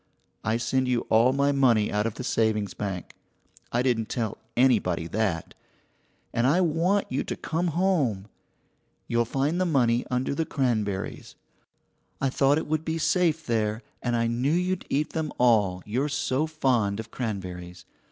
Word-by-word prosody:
I 110 +2 +1
send 130 +3 0
you 125 -2 +1
all 115 +3 +5
my 140 +1 +2
money 125 -6 +3
out 105 +1 +1
of 115 - -5
the 130 - -6
savings 110 -5 0
bank 95 -4 -5 0.6
(I 120 +1 +1
didn't 115 -4 0
tell 115 -4 -3 0.2
anybody 110 -10 +3
that), 95 -2 -2 0.8
and 120 +2 +2
I 155 +7 +4
want 180 +4 +2
you 130 - 0
to - - -4
come 170 +3 -2
home. 160 - +1 0.8
You'll 120 0 +1
find 140 +9 0
the - - +2
money 120 -6 +2
under 125 +2 0
the 160 - 0
cranberries. 110 -10 -2 0.8
I 135 -1 0
thought 140 +2 +3
it - - -2
would 155 0 -1
be 160 0 -2
safe 160 0 +1
there, 110 -1 -1 0.2
and 120 -1 0
I 115 0 +1
knew 120 +5 0
you'd 180 +1 -1
eat 150 +2 0
them 160 -2 -2
all, 105 -7 +3
you're 130 +8 -1
so 145 +1 0
fond 125 -10 +1
of 110 0 -7
cranberries. 90 -6 -5
125 Hz, 160 wpm, -26 LUFS, 110-150 Hz, 0.8 s, all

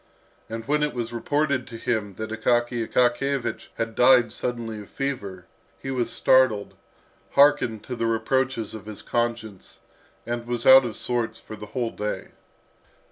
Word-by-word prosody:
And 115 0 -6
when 150 +1 +2
it 150 -2 -1
was 120 -1 -4
reported 140 +1 0
to 115 - -8
him 110 -4 -2
that 110 +2 -6
Akaky 120 +1 0
Akakiyevich 125 0 0
had 115 0 -3
died 125 0 +5
suddenly 115 -3 -4
of 100 - -13
fever, 100 -10 -4 0.3
he 135 - -6
was 125 -3 -1
startled, 130 -6 +3 0.6
hearkened 140 -6 +4
to 125 - -5
the 115 -1 -1
reproaches 115 0 0
of 110 -1 -9
his 105 -2 -8
conscience, 115 -4 -3 0.5
and 120 0 -4
was 120 -1 -3
out 130 0 +9
of 115 -3 -4
sorts 120 -2 -2
for 110 - -10
the 105 0 -9
whole 120 +1 -2
day. 105 0 -4
120 Hz, 155 wpm, -25 LUFS, 110-130 Hz, 0.6 s, out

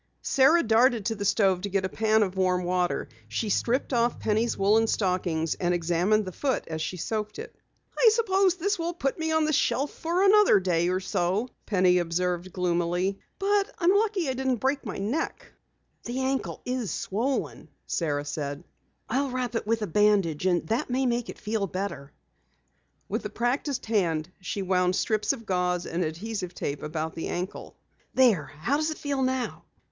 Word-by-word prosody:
Sara 310 +5 +4
darted 230 -1 +3
to 225 - 0
the 200 - -4
stove 195 -3 +3
to 200 - -3
get 195 -1 0
a - - +1
pan 220 +2 +2
of 190 -2 -3
warm 185 -1 +1
water. 180 0 0 0.2
She 160 - -2
stripped 245 +7 0
off 235 0 +1
Penny's 220 +2 0
woolen 215 +3 +3
stockings 180 -6 0
and 175 0 0
examined 175 +5 +1
the 185 - -5
foot 265 +8 -1
as 160 -1 -4
she 180 - -3
soaked 215 +4 -3
it. - - -8 0.4
"I 475 - +6
suppose 390 -5 +2
this 400 +2 -1
will 335 +1 -2
put 275 -1 -2
me 320 0 -1
on 315 -1 +3
the 310 - 0
shelf 280 +1 +1
for 345 +3 -1
another 405 - +6
day 175 -2 +1
or 185 +1 +1
so," 190 +5 -1 0.2
Penny 180 -3 +4
observed 175 +1 -1
gloomily. 175 +2 0 0.2
"But 400 0 +1
I'm 355 +1 +3
lucky 405 -5 +1
I 265 - 0
didn't 260 0 0
break 265 +4 -1
my 215 -7 -5
neck." 230 +12 -3 0.5
"The 240 +2 -3
ankle 265 0 -2
is 250 -4 -2
swollen," 230 - -2 0.2
Sara 145 -4 -1
said, 145 -1 -4 0.4
"I'll 270 +4 0
wrap 250 -1 -2
it 230 - -2
with 225 0 +1
a - - +1
bandage 195 -4 +2
and 175 -3 +1
that 245 +6 0
may 260 +2 +1
make 240 -1 0
it - - -7
feel 215 -2 -2
better." 185 -7 -5 1.0
With - - -3
a - - -2
practiced 255 +3 -1
hand 175 -7 0
she 195 +2 -3
wound 180 -1 +2
strips 215 +1 +1
of 245 -5 -6
gauze 180 -2 0
and 175 +2 -2
adhesive 180 +3 -4
tape 140 0 -3
about 155 +1 -3
the 165 - -4
ankle. 180 +2 -5 0.4
"There, 230 - +4 0.2
how 280 - +1
does 310 +1 0
it 315 - -4
feel 280 -2 -2
now?" 260 -1 -1
210 Hz, 185 wpm, -27 LUFS, 180-260 Hz, 1.0 s, I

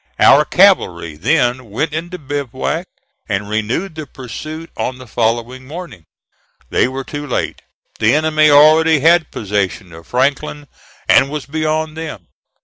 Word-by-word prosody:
Our - - +6
cavalry 80 -3 +3
then 125 - 0
went 150 +9 -2
into 175 +3 -4
bivouac, 145 +3 -3 0.4
and 100 0 -2
renewed 110 - -2
the 155 -2 -7
pursuit 155 +7 -8
on 125 - -3
the 130 - -11
following 120 +3 -2
morning. 155 - -9 0.7
They - - +3
were 135 +1 -5
too 145 +2 -6
late. 125 - -3 0.4
The 115 +5 +3
enemy 155 0 +3
already 155 +1 +6
had 165 +1 +4
possession 100 -3 -3
of 80 0 -13
Franklin, 145 +3 -1 0.4
and 135 - +5
was 150 -1 -5
beyond 155 +1 -2
them. 155 - -7
140 Hz, 140 wpm, -17 LUFS, 115-155 Hz, 0.7 s, Our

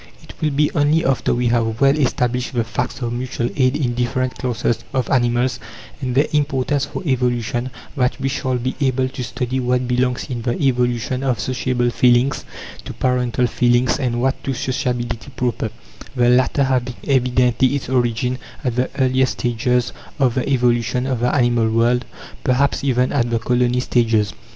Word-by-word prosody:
It - - -12
will 155 - +2
be 150 +1 +1
only 155 +3 +2
after 135 -2 +1
we 120 0 +1
have 115 -1 0
well 140 0 +4
established 125 -3 0
the 120 - +2
facts 115 +3 -4
of 120 0 -2
mutual 120 -1 -3
aid 130 -1 +2
in 130 -5 0
different 125 +1 -1
classes 120 -2 -1
of 130 - 0
animals, 120 0 +1 0.4
and 125 -1 -2
their 140 +3 +4
importance 145 -1 +1
for 145 - -6
evolution, 125 -2 0 0.3
that 125 -3 0
we 135 - -1
shall 130 -2 -1
be 130 +2 -2
able 130 -1 +1
to 130 -1 -6
study 125 +1 -3
what 125 0 0
belongs 125 0 0
in 125 -4 -4
the 120 +1 -2
evolution 125 -2 0
of 130 -5 0
sociable 125 +2 0
feelings, 125 +3 +2 0.4
to - - -6
parental 125 -1 0
feelings, 120 +2 +2
and 120 -3 -1
what 130 +2 0
to 135 - -2
sociability 120 -1 -2
proper 120 -3 -1 0.5
the 120 -1 +3
latter 130 +3 +3
having 130 -2 0
evidently 125 0 +2
its 140 - -4
origin 125 0 0 0.2
at 125 -3 -1
the 125 - +1
earliest 130 -1 +2
stages 120 +1 0 0.2
of 130 -5 +2
the 130 +2 -1
evolution 125 -1 +1
of 130 -3 -1
the 125 +1 +1
animal 120 -3 +2
world, 120 +2 +2 0.4
perhaps 140 +1 +1
even 125 -2 +1
at 120 -4 +1
the 115 - +1
"colony 125 +2 +1
stages." 115 -6 +1
125 Hz, 170 wpm, -20 LUFS, 120-130 Hz, 0.5 s, well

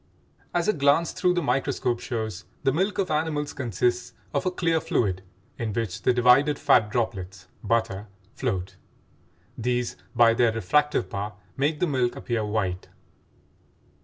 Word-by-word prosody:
As 175 -1 0
a 215 - +4
glance 145 +2 +3
through 180 0 +1
the 175 - 0
microscope 135 -3 0
shows, 110 -3 -4 0.2
the 135 - +3
milk 190 +6 0
of 190 -4 0
animals 150 -1 -1
consists 120 0 -1 0.2
of 140 +4 0
a - - +4
clear 165 -3 0
fluid 95 -9 0 0.4
in 110 -3 -2
which 110 -5 -3
the - - +3
divided 125 +4 +4
fat 125 -7 +4
droplets 95 -5 -3 0.2
(butter) 110 -2 0 0.3
float; 95 -8 -3 0.8
these 120 +1 -1 0.2
by 115 -1 +6
their 115 -1 +3
refractive 115 +3 +1
power 100 +2 -4 0.2
make 150 +2 0
the - - +2
milk 130 -6 0
appear 115 -3 -2
white. 105 -4 -2
120 Hz, 145 wpm, -26 LUFS, 110-150 Hz, 0.8 s, by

